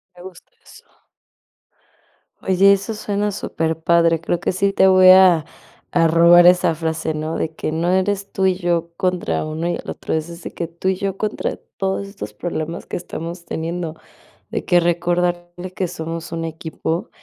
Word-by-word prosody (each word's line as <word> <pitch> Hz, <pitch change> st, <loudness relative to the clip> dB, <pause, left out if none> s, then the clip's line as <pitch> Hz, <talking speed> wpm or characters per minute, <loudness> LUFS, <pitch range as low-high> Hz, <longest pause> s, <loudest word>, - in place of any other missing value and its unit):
Me 175 Hz, -, -14 dB
gusta 185 Hz, -2 st, -13 dB
eso. -, -, -17 dB, 1.6 s
Oye, 195 Hz, +1 st, +5 dB
eso 200 Hz, +3 st, -2 dB
suena 210 Hz, -1 st, -2 dB
superpadre, 165 Hz, -2 st, +1 dB
creo 170 Hz, +1 st, -2 dB
que -, -, 0 dB
sí 195 Hz, +2 st, 0 dB
te 190 Hz, -, +5 dB
voy 185 Hz, -1 st, +7 dB
a 185 Hz, -4 st, +7 dB, 0.5 s
a 165 Hz, -1 st, +3 dB
robar 170 Hz, +1 st, +6 dB
esa 180 Hz, -2 st, +5 dB
frase, 160 Hz, 0 st, -2 dB
¿no? 155 Hz, +1 st, -3 dB
de 160 Hz, 0 st, -3 dB
que 155 Hz, -, -3 dB
no 165 Hz, +2 st, -1 dB
eres 195 Hz, +2 st, 0 dB
tú 190 Hz, -, 0 dB
y 190 Hz, -1 st, +3 dB
yo 170 Hz, -2 st, -1 dB
contra 180 Hz, -3 st, -1 dB
uno 160 Hz, +2 st, -3 dB
y 175 Hz, -, 0 dB
el -, -, -8 dB
otro, -, -, -4 dB
es 160 Hz, 0 st, -1 dB
decir, 170 Hz, 0 st, -9 dB
que 170 Hz, -, -4 dB
tú 170 Hz, +3 st, -3 dB
y 190 Hz, -, +1 dB
yo 195 Hz, 0 st, -3 dB
contra 215 Hz, +1 st, -3 dB, 0.2 s
todos 195 Hz, +1 st, -1 dB
estos 150 Hz, -, -8 dB
problemas 165 Hz, +6 st, -5 dB
que -, -, -4 dB
estamos 170 Hz, 0 st, -7 dB
teniendo, 165 Hz, 0 st, -4 dB, 0.5 s
de -, -, -3 dB
que 175 Hz, -, +3 dB
recordarle 175 Hz, +1 st, -1 dB
que 185 Hz, -2 st, -2 dB
somos 165 Hz, 0 st, -6 dB
un 165 Hz, -1 st, -3 dB
equipo, 160 Hz, +1 st, -4 dB
175 Hz, 175 wpm, -20 LUFS, 165-185 Hz, 1.6 s, voy